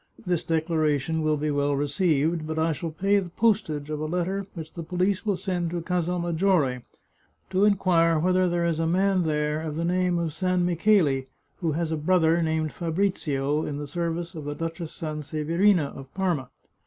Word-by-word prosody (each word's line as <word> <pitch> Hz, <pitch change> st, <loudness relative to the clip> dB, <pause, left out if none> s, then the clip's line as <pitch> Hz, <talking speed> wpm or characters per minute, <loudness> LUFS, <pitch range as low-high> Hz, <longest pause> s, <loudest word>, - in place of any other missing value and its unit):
This 175 Hz, -3 st, 0 dB
declaration 160 Hz, -2 st, 0 dB
will 155 Hz, -1 st, +1 dB
be 150 Hz, +1 st, -1 dB
well 145 Hz, 0 st, +1 dB
received, 155 Hz, +2 st, +1 dB
but 160 Hz, 0 st, -3 dB
I 160 Hz, +1 st, +2 dB
shall 165 Hz, +2 st, -3 dB
pay 195 Hz, +6 st, +2 dB
the 185 Hz, -3 st, -5 dB
postage 165 Hz, -8 st, 0 dB
of 150 Hz, -, -2 dB
a 155 Hz, -, -2 dB
letter 180 Hz, +4 st, -2 dB
which 160 Hz, -2 st, -8 dB
the 170 Hz, -, -6 dB
police 185 Hz, +5 st, -1 dB
will 200 Hz, -3 st, +1 dB
send 180 Hz, -2 st, -2 dB
to 175 Hz, 0 st, -3 dB
Casal 180 Hz, 0 st, -1 dB
Maggiore 170 Hz, -6 st, +1 dB, 0.7 s
to 190 Hz, +2 st, +3 dB
inquire 175 Hz, -5 st, +3 dB
whether 185 Hz, +3 st, +2 dB
there 175 Hz, 0 st, 0 dB
is 165 Hz, -2 st, 0 dB
a 165 Hz, -, +1 dB
man 190 Hz, +2 st, +2 dB
there 150 Hz, 0 st, 0 dB
of 155 Hz, -2 st, -4 dB
the 165 Hz, +1 st, -1 dB
name 180 Hz, 0 st, +1 dB
of 165 Hz, -3 st, -2 dB
San 180 Hz, +2 st, +1 dB
Micheli, 170 Hz, -7 st, +2 dB, 0.3 s
who 165 Hz, -5 st, -1 dB
has 165 Hz, +1 st, -1 dB
a 160 Hz, -, 0 dB
brother 165 Hz, +1 st, +3 dB
named 160 Hz, -1 st, 0 dB
Fabrizio 155 Hz, -5 st, -1 dB
in 145 Hz, -, -4 dB
the 145 Hz, -, -4 dB
service 170 Hz, +3 st, -3 dB
of 155 Hz, -4 st, -7 dB
the 145 Hz, 0 st, -4 dB
Duchess 165 Hz, 0 st, -5 dB
Sanseverina 155 Hz, +2 st, 0 dB
of 135 Hz, -1 st, -10 dB
Parma. 175 Hz, -9 st, -1 dB
165 Hz, 185 wpm, -26 LUFS, 155-180 Hz, 0.7 s, to